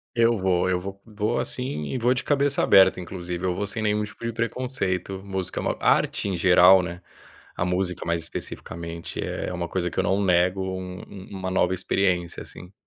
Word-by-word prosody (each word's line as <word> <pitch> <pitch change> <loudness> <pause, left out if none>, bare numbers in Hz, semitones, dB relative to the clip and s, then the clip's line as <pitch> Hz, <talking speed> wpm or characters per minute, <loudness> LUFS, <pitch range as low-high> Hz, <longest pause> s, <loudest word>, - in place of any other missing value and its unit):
Eu 115 -1 +4
vou, 95 -1 +1
eu 90 -1 +1
vou 95 +1 -8
vou 110 +1 -2
assim 125 - -3
e 130 - -3
vou 120 +1 +3
de 125 -1 -2
cabeça 140 -1 +2
aberta, 95 -1 +6
inclusive. 90 -1 -6
Eu 90 - 0
vou 100 +3 -2
sem 110 +3 -3
nenhum 105 0 +1
tipo 105 +2 -9
de 115 - -1
preconceito, 115 -6 -2
música 95 -2 -3
é - - -2
uma - - 0
arte - - +2
em 95 - -1
geral, 90 +1 +7
né, 90 +1 -6 0.5
a 90 - -1
música 90 0 -1
mais 85 0 0
especificamente 85 0 -5
é - - -3
uma 85 -1 -3
coisa 90 0 -1
que - - -12
eu - - +2
não 100 +1 +1
nego 90 +1 +3
um 95 -1 -5
um 95 -2 -11
uma 95 -1 -4
nova 95 0 +2
experiência 90 -1 0
assim. 90 +2 -11
95 Hz, 200 wpm, -25 LUFS, 90-105 Hz, 0.5 s, geral